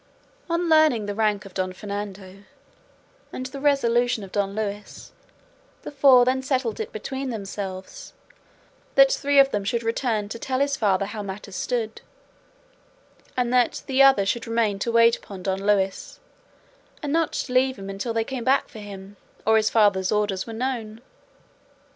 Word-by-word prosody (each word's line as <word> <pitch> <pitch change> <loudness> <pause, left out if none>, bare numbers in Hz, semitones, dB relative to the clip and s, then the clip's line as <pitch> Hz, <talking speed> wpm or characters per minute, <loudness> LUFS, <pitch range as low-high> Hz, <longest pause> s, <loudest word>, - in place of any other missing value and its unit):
On 340 +1 0
learning 310 -9 +4
the 205 - -3
rank 210 -2 0
of 195 - -12
Don 185 -1 -2
Fernando 200 -1 -7 0.9
and 255 - -5
the 260 +2 -7
resolution 245 -5 +2
of 190 - -10
Don 200 -1 -1
Luis 205 -1 -5 0.7
the - - -7
four 270 -3 +6
then 260 +1 +1
settled 260 -4 -1
it - - -4
between 265 +5 -5
themselves 195 -4 -6 0.8
that - - +7
three 285 - +1
of 275 0 +6
them 205 -1 -1
should 235 +4 -1
return 225 -2 -1
to 230 - -6
tell 260 +1 -2
his 280 0 +1
father 195 -5 +1
how 210 +1 -6
matters 200 0 -8
stood, 230 -1 -3 1.4
and 245 -1 0
that 245 -1 +2
the 270 0 +2
other 270 -7 +6
should 230 +4 -2
remain 225 -3 0
to 235 - -1
wait 230 0 +5
upon 190 -3 -11
Don 195 0 -2
Luis, 195 -2 0 0.8
and 290 -1 -2
not 330 -1 0
leave 255 0 +1
him 195 0 -8
until 195 +4 -4
they 225 0 0
came 255 0 -5
back 270 +3 +2
for 220 - -11
him, 200 -1 -10 0.3
or 220 - +4
his 220 0 +3
father's 200 -4 +3
orders 205 -2 0
were - - -6
known. 230 -2 -4
225 Hz, 165 wpm, -24 LUFS, 200-260 Hz, 1.4 s, that